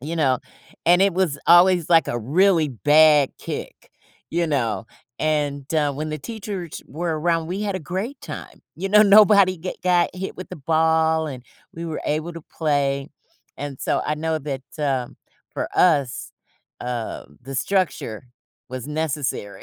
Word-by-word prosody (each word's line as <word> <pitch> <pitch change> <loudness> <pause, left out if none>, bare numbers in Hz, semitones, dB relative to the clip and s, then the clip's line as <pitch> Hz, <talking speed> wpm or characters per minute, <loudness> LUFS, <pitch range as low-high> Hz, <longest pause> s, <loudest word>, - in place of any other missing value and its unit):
you 160 +5 -5
know, 130 -5 +2 0.5
and 175 +2 +6
it 195 -2 +3
was 175 -6 0
always 175 0 +5
like 165 -1 +5
a 120 - -1
really 165 - +3
bad 150 +2 +5
kick, - - -7 0.4
you 170 0 0
know, 115 -7 -1 0.3
and, 145 -2 -1
uh, 145 -2 +2
when 155 +3 -4
the 155 - -4
teachers 195 -2 -6
were 160 +1 -3
around, 165 -1 +1
we 185 +4 -4
had 200 -2 -2
a - - -3
great 190 - -5
time. - - -9
You 195 +4 -3
know, 210 +2 +7
nobody 200 -2 +6
get 180 +3 -7
got 180 -1 +3
hit 190 +1 -6
with 185 - -8
the - - -8
ball, 160 +1 +2
and 130 -4 -7 0.3
we 165 +1 -6
were 160 -2 -4
able 155 +3 -1
to 165 - -8 0.2
play. 140 -3 0 0.5
And 140 -2 -6
so - - 0
I 150 - 0
know 160 0 -1
that, 135 -3 -5 0.2
um, 135 -4 -2 0.4
for - - -3
us, 145 -8 +2 0.5
uh, 120 -2 -4 0.2
the 135 +1 -8
structure 140 - -1 0.4
was 130 +2 -6
necessary 150 -9 -3
160 Hz, 160 wpm, -22 LUFS, 140-175 Hz, 0.5 s, know